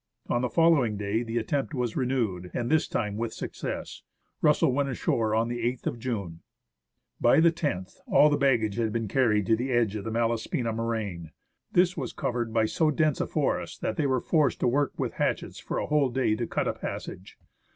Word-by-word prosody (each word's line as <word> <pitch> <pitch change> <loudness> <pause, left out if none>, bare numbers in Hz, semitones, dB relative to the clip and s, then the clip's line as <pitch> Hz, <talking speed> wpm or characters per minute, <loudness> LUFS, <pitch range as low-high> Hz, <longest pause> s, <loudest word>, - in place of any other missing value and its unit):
On 120 - +1
the 125 - 0
following 150 -10 +3
day 105 +2 -1
the 115 0 -3
attempt 135 +6 -1
was 120 -3 -2
renewed, 115 -9 -1
and 120 +2 -1
this 160 0 +3
time 105 -2 -2
with 115 0 -3
success. - - -5 0.4
Russell - - +4
went 140 +1 0
on 130 - -3
shore 110 -2 0
on 115 +1 +2
the 120 0 -3
8th 120 +1 -2
of 120 - -2
June. 100 -9 -4 0.8
By - - +5
the 165 +1 +5 0.2
loth 95 +1 -10
all 150 - +6
the - - +4
baggage 120 -7 +2
had 115 -2 0
been 115 0 -2
carried 105 -4 +2
to 110 - +4
the 125 +4 -3
edge 120 -4 +1
of 105 - -4
the 115 - -4
Malaspina 115 +2 -1
moraine. 110 -8 -3 0.4
This 180 +1 +3
was 135 -6 -4
covered 120 -2 -2
by 110 -1 +2
so 155 +8 +1
dense 150 -1 +1
a - - -1
forest - - -2
that 110 - -1
they 145 - +1
were 130 -2 +1
forced 155 -5 +2
to - - +3
work 140 +3 +2
with - - -2
hatchets - - -2
for - - -4
a - - -1
whole 150 -3 +2
day 125 -3 +1
to 120 +1 -3
cut - - -1
a - - 0
passage. 95 - -7
120 Hz, 210 wpm, -27 LUFS, 110-135 Hz, 0.8 s, all